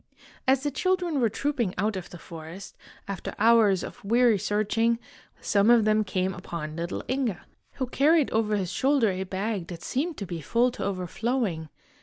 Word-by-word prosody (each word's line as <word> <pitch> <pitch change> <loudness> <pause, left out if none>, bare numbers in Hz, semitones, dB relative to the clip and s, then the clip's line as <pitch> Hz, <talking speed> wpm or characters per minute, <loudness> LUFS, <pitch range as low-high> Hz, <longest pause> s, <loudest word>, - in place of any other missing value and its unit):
As 265 0 +3
the 290 - 0
children 360 -1 0
were 230 - +3
trooping 240 -4 -1
out 210 +3 0
of 185 -2 -6
the 175 - -10
forest, 165 +3 -10 0.3
after 195 -1 -5
hours 215 -4 +4
of 245 - -9
weary 230 0 +4
searching, 220 +4 +1 0.4
some 200 +1 +3
of 235 -3 +6
them 215 0 +3
came 185 -1 -1
upon 170 -4 -6
little 170 +2 -4
Inge, 255 -8 0 0.4
who 260 - -2
carried 290 +4 +3
over 215 -1 +1
his 190 -3 -2
shoulder 265 -2 +2
a 185 0 -3
bag 190 0 -3
that 170 -2 -8
seemed 305 +5 -2
to 200 - -4
be 170 -3 -5
full 240 - +2
to - - -6
overflowing. 190 -2 -2
215 Hz, 175 wpm, -27 LUFS, 185-245 Hz, 0.4 s, of